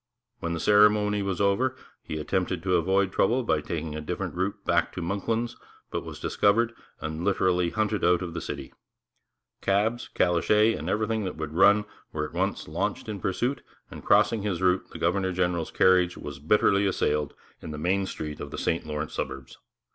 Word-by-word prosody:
When 85 0 -2
the 85 - -3
ceremony 105 +2 +4
was 100 -2 -2
over 110 +7 +2 0.3
he 80 - -5
attempted 90 +3 -1
to 90 -1 +2
avoid 95 +3 +2
trouble 120 +8 +2
by 75 - +1
taking 80 0 -4
a 75 - -4
different 75 - -4
route 95 +3 -3
back - - +2
to - - -5
'Monklands,' 110 +6 -2 0.4
but - - -2
he - - -12
was - - -8
discovered, 115 +3 +2 0.3
and 80 +2 -4
literally 90 -2 +2
hunted 105 +1 -1
out 90 0 +3
of 85 -2 -5
the 85 - -4
city. - - -6 0.9
'Cabs, 105 +5 0
calèches, 105 +6 +3
and 80 +4 -5
everything 110 +2 0
that 95 - -4
would 80 -1 -5
run 100 +4 +5 0.3
were 75 -1 -2
at - - -9
once - - -1
launched - - -2
in 105 -2 -4
pursuit, 120 +8 -1 0.3
and - - -9
crossing 115 -2 +4
his 100 -4 -2
route, 90 0 +1
the - - -9
governor 95 -1 +1
general's 90 -2 0
carriage 90 -1 +3
was 75 -2 -7
bitterly 100 +5 +3
assailed 75 -5 0 0.3
in - - -8
the 75 - -5
main 95 +5 0
street 75 -4 -6
of - - -6
the - - -7
St 80 -1 -1
Lawrence 75 0 -4
suburbs. - - -5
95 Hz, 185 wpm, -27 LUFS, 85-105 Hz, 0.9 s, run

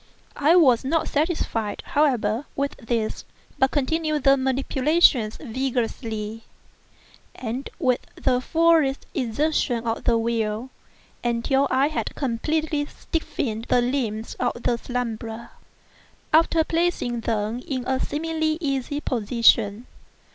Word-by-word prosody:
I 300 +4 +4
was 265 -10 +5
not 315 +4 0
satisfied, 290 - -1
however, 250 -4 +1
with 280 0 -1
this, 230 -3 -2 0.4
but 265 - +4
continued 305 +1 0
the 275 0 +6
manipulations 265 -2 +2
vigorously, 225 -4 -3 0.9
and 250 +3 -5
with 255 -8 +1
the 250 -1 +1
fullest 320 -2 +2
exertion 245 -1 0
of 225 0 -2
the 235 -1 +4
will, 225 +1 -1 0.5
until 240 +4 +1
I 270 +3 +3
had 310 - -3
completely 295 +4 -1
stiffened 235 -11 -4
the 250 - +4
limbs 235 -4 -2
of 240 - -1
the 240 - +1
slumberer, 230 -2 -4 0.8
after 325 0 +4
placing 330 -8 0
them 225 +1 -2
in 255 -3 -3
a 260 0 0
seemingly 315 +1 -1
easy 285 -1 -2
position. 230 -2 +2
260 Hz, 110 wpm, -24 LUFS, 230-295 Hz, 0.9 s, the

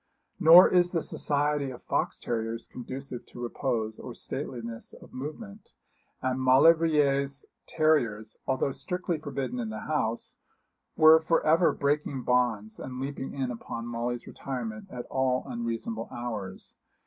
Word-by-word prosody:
Nor 170 +3 +9
is 175 0 +4
the 165 - 0
society 145 -1 0
of 125 - -10
fox - - -1
terriers 115 0 -3
conducive 130 0 -7
to - - -12
repose 120 -2 -2
or 120 - -8
stateliness 115 -5 -6
of - - -14
movement; 200 - -8 0.5
and 130 0 0
Maulevrier's 140 0 +4 0.2
terriers, 120 -9 +1
although 130 +1 +1
strictly 180 +2 -3
forbidden 155 - -3
the 220 - -5
house, 115 -7 -2 0.6
were 155 +1 +8
for 165 +1 +1
ever 165 +3 +5
breaking 140 -2 -1
bonds 120 -4 +1
and 130 -1 -6
leaping 135 0 -5
in 130 -2 -2
upon 115 0 -6
Molly's 120 +1 -3
retirement 115 -5 -5
at 125 -1 -6
all 130 -1 +1
unreasonable 115 -2 -4
hours. 110 -6 -6
130 Hz, 130 wpm, -28 LUFS, 120-150 Hz, 0.6 s, Nor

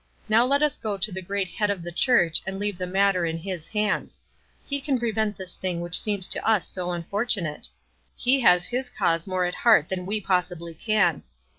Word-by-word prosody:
Now 230 +3 +4
let 280 +2 +2
us 300 -2 +1
go 210 -2 -3
to 195 +3 0
the 190 +1 -5
great 195 +1 -2
Head 210 +3 -1
of 195 -4 -2
the 175 - -6
Church 185 -6 +3
and 190 0 -3
leave 205 -2 -3
the 180 - -2
matter 195 -1 +2
in 165 -1 -1
his 175 -1 -5
hands. 210 -1 -2 0.5
He 280 -1 -1
can 275 -2 0
prevent 220 -3 -1
this 185 -2 -6
thing 180 -2 -3
which 175 +1 +2
seems 205 -4 -1
to - - -1
us 220 -5 +2
so 180 -1 -3
unfortunate. 175 -2 -1 0.5
He 260 +2 +2
has 180 -7 +5
his 250 +1 -2
cause 165 +1 0
more 185 -1 0
at 175 - -2
heart 220 -10 +4
than 185 -1 -3
we 215 +2 0
possibly 180 -3 -1
can. 180 -3 +1
195 Hz, 205 wpm, -25 LUFS, 175-215 Hz, 0.5 s, has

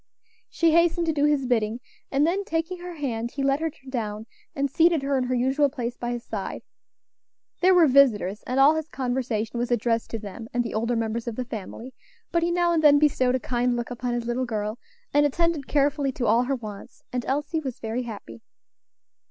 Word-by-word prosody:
She 335 -1 +2
hastened 335 +1 +3
to 320 - +1
do 290 -1 +2
his 295 -3 +2
bidding, 230 -2 0 0.3
and 280 +2 +2
then 375 +5 0
taking 330 +1 -2
her 355 0 -7
hand 235 -6 -3
he 275 - -3
led 275 +1 +2
her 325 0 -1 0.2
down 220 -4 -4 0.3
and 280 0 +1
seated 325 +1 +3
her 275 0 0
in 255 -1 +1
her 255 0 -1
usual 265 +4 +2
place 245 -3 -4
by 240 0 -4
his 240 -1 -4
side. 205 -3 -5 1.0
There 370 +1 +5
were 350 -2 +7
visitors, 235 -8 +3
and 255 +2 0
all 280 +3 +7
his 315 -1 -3
conversation 245 -5 -2
was 240 - -1
addressed 230 -1 0
to 225 - -3
them 215 +1 -8
and 245 - +2
the 235 - -5
older 230 +2 0
members 230 +1 -2
of 235 - -3
the 255 - -3
family, 230 +3 -7 0.4
but 340 - +2
he 340 - +1
now 345 0 +2
and 325 - +2
then 295 -2 +7
bestowed 260 -4 +3
a - - 0
kind 245 0 0
look 240 0 -4
upon 245 0 -2
his 240 -1 -3
little 245 +2 -1
girl, 215 0 -3 0.3
and 290 - +5
attended 315 0 0
carefully 285 -1 +1
to 245 - -2
all 230 +3 +3
her 275 +2 0
wants; 215 0 -10
and 250 -1 -1
Elsie 295 +4 -1
was 265 -6 -6
very 225 +2 -3
happy. 200 - -8
255 Hz, 210 wpm, -25 LUFS, 235-295 Hz, 1.0 s, were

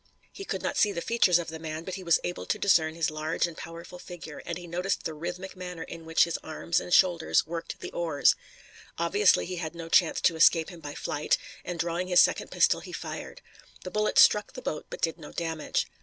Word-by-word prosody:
He 390 - -8
could - - -4
not - - -2
see 210 - +4
the 170 - -3
features 185 -3 +3
of 170 -1 -4
the 160 0 -7
man, 160 0 -5
but 185 - -6
he 190 0 -6
was 170 -2 +4
able 175 - -4
to - - 0
discern 160 -5 +3
his 165 -2 0
large 155 +2 -1
and 170 -2 -6
powerful 170 +2 -9
figure, 165 -5 -9
and 170 - -3
he 175 - -9
noticed 180 +3 -2
the 160 - -3
rhythmic 175 +5 -6
manner 180 -2 -6
in 165 -1 -9
which 165 0 +4
his 170 - -2
arms 165 +2 -1
and - - -8
shoulders 175 -3 +4
worked 165 +1 -5
at - - -27
the - - -6
oars. 155 -6 +3 0.6
Obviously 185 +5 +3
he 180 0 -5
had 165 -1 -5
no 165 -1 -7
chance 170 -1 +4
to 165 - +3
escape 160 +1 +5
him 175 - -11
by 145 -2 -8
flight, 150 +1 0 0.3
and 180 - -5
drawing 170 +2 -1
his 180 -1 +5
second - - +3
pistol - - +3
he - - -10
fired. - - -7 0.4
The 185 - -6
bullet 210 0 0
struck 210 0 +6
the 255 - -8
boat 150 - -4
but - - -8
did 165 +1 0
no 150 - -10
damage. 165 -2 -2
170 Hz, 230 wpm, -28 LUFS, 160-180 Hz, 0.6 s, struck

